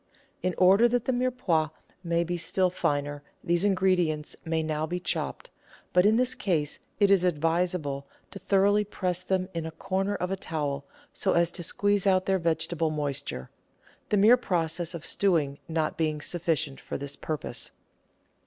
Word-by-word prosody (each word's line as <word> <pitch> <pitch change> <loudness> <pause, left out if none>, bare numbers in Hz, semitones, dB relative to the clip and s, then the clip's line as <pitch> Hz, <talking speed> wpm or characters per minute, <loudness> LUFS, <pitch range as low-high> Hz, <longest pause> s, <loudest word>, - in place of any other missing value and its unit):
In 185 -1 -1
order 195 +6 +6
that 240 0 0
the 260 - +1
Mirepoix 245 -11 +1 0.3
may 170 0 +1
be 175 +1 -2
still 180 +1 +1
finer, 145 -3 -1 0.2
these 175 +1 +1
ingredients 185 -6 +1
may 160 -1 -1
now 155 0 -1
be 180 +2 -2
chopped, 180 - -3 0.4
but 180 +2 +5
in 215 - +4
this 250 +2 +2
case 160 - -1 0.2
it 200 -1 +5
is 195 -3 +5
advisable 165 -4 0 0.2
to 195 - -8
tho 195 - +4
roughly 205 +1 +4
press 185 -3 -2
them 185 0 0
in 165 -1 -3
a - - -3
corner 195 +5 -2
of 180 +1 -3
a - - +1
towel, 145 -6 -3 0.3
so - - +1
as 170 0 +3
to 180 - -4
squeeze 205 +3 +1
out 185 -1 +3
their 190 -1 +2
vegetable 165 0 0
moisture, 145 - -3 0.6
the 210 - +2
mere 220 +5 +7
process 170 -5 -1
of 165 - -7
stewing 155 -8 +1
not 160 -1 -1
being 155 -2 0
sufficient 160 -3 -1
for - - -5
this 140 0 -6
purpose. 155 -6 -4
175 Hz, 170 wpm, -28 LUFS, 155-195 Hz, 0.6 s, mere